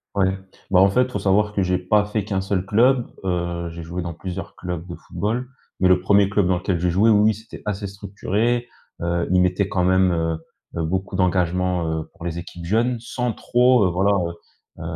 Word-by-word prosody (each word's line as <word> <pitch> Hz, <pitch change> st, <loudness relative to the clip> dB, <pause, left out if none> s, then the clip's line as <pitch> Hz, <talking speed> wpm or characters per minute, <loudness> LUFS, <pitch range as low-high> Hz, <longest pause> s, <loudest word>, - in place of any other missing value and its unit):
Ouais, 95 Hz, -1 st, +2 dB, 0.4 s
bah 90 Hz, -, +5 dB
en 95 Hz, +1 st, +6 dB
fait 125 Hz, +6 st, +3 dB
il 125 Hz, -, -4 dB
faut 105 Hz, -, -2 dB
savoir 105 Hz, +2 st, +2 dB
que 100 Hz, -, 0 dB
j'ai 90 Hz, -1 st, +1 dB
pas 100 Hz, +3 st, +2 dB
fait 105 Hz, 0 st, -2 dB
qu'un 95 Hz, -2 st, -1 dB
seul 95 Hz, -1 st, -1 dB
club, 120 Hz, +5 st, +3 dB, 0.2 s
heu, 85 Hz, -2 st, -2 dB
j'ai 85 Hz, 0 st, -8 dB
joué 85 Hz, +2 st, -5 dB
dans 85 Hz, -1 st, -5 dB
plusieurs 95 Hz, +2 st, -6 dB
clubs 90 Hz, -2 st, -5 dB
de 85 Hz, -, -6 dB
football, 120 Hz, +5 st, -3 dB, 0.3 s
mais 95 Hz, -, +4 dB
le 90 Hz, 0 st, +5 dB
premier 100 Hz, +1 st, +4 dB
club 100 Hz, -2 st, +2 dB
dans 90 Hz, -1 st, +2 dB
lequel 90 Hz, 0 st, -1 dB
j'ai 90 Hz, +1 st, +1 dB
joué, 100 Hz, +6 st, +4 dB
oui, 105 Hz, -, +5 dB
oui 110 Hz, +1 st, +4 dB
c'était 110 Hz, +2 st, -12 dB
assez 105 Hz, -1 st, -3 dB
structuré, 105 Hz, +4 st, -2 dB, 0.4 s
heu, 85 Hz, 0 st, 0 dB
ils 90 Hz, -, +4 dB
mettaient 90 Hz, +2 st, +1 dB
quand 90 Hz, -, 0 dB
même, 95 Hz, 0 st, +3 dB
heu, 80 Hz, -1 st, 0 dB, 0.4 s
heu, -, -, 0 dB
beaucoup 95 Hz, +4 st, -2 dB
d'engagement, 90 Hz, -1 st, +1 dB
heu, 80 Hz, 0 st, -3 dB
pour 85 Hz, -, -11 dB
les 85 Hz, 0 st, -3 dB
équipes 85 Hz, 0 st, -9 dB
jeunes 115 Hz, +6 st, +1 dB
sans 120 Hz, 0 st, -3 dB
trop, 125 Hz, -1 st, +3 dB
heu, -, -, +3 dB
voilà, 95 Hz, +4 st, +2 dB, 0.7 s
heu, -, -, -8 dB
95 Hz, 215 wpm, -22 LUFS, 90-105 Hz, 0.7 s, en